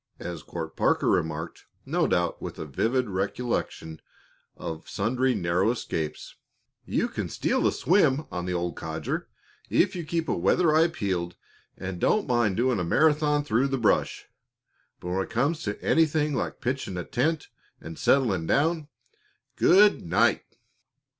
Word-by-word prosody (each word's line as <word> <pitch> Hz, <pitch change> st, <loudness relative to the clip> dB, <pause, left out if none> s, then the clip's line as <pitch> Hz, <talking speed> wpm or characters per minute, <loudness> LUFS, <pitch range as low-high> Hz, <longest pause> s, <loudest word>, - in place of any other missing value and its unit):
As 85 Hz, -3 st, -6 dB
Court 80 Hz, 0 st, -7 dB
Parker -, -, +2 dB
remarked, 80 Hz, 0 st, -1 dB, 0.2 s
no -, -, +1 dB
doubt 85 Hz, -1 st, 0 dB
with -, -, -6 dB
a -, -, -5 dB
vivid 120 Hz, -, 0 dB
recollection 95 Hz, -4 st, -3 dB, 0.6 s
of 80 Hz, -1 st, -7 dB
sundry 125 Hz, +5 st, 0 dB
narrow 90 Hz, +4 st, +1 dB
escapes: 80 Hz, -10 st, -4 dB, 0.5 s
"You -, -, 0 dB
can -, -, -4 dB
steal -, -, +1 dB
a -, -, +2 dB
swim 155 Hz, -6 st, +2 dB
on 90 Hz, 0 st, -4 dB
the 90 Hz, -, -1 dB
old 85 Hz, -1 st, -2 dB
codger 80 Hz, -1 st, -4 dB, 0.4 s
if -, -, +2 dB
you 175 Hz, -, -4 dB
keep 165 Hz, +1 st, -2 dB
a -, -, 0 dB
weather 155 Hz, -, +3 dB
eye 160 Hz, +2 st, +5 dB
peeled 95 Hz, -, -3 dB, 0.4 s
and 90 Hz, -1 st, -5 dB
don't 215 Hz, -, +2 dB
mind 120 Hz, -7 st, +1 dB
doing 125 Hz, -2 st, +2 dB
a -, -, 0 dB
Marathon 150 Hz, -, +2 dB
through 130 Hz, 0 st, +1 dB
the 135 Hz, -1 st, -1 dB
brush; 115 Hz, -4 st, +1 dB, 0.7 s
but 90 Hz, -, -6 dB
when 95 Hz, +2 st, 0 dB
it -, -, -5 dB
comes 140 Hz, +8 st, 0 dB
to 105 Hz, -1 st, -4 dB
anything 155 Hz, -2 st, +2 dB
like 130 Hz, -, -3 dB
pitching 130 Hz, -7 st, -3 dB
a 90 Hz, -, -3 dB
tent 150 Hz, +5 st, -1 dB, 0.3 s
and 80 Hz, 0 st, -9 dB
settling 100 Hz, -12 st, +2 dB
down 155 Hz, +1 st, +1 dB, 0.7 s
good 205 Hz, +3 st, +5 dB
night!" 85 Hz, -, +2 dB
115 Hz, 155 wpm, -26 LUFS, 90-150 Hz, 0.7 s, eye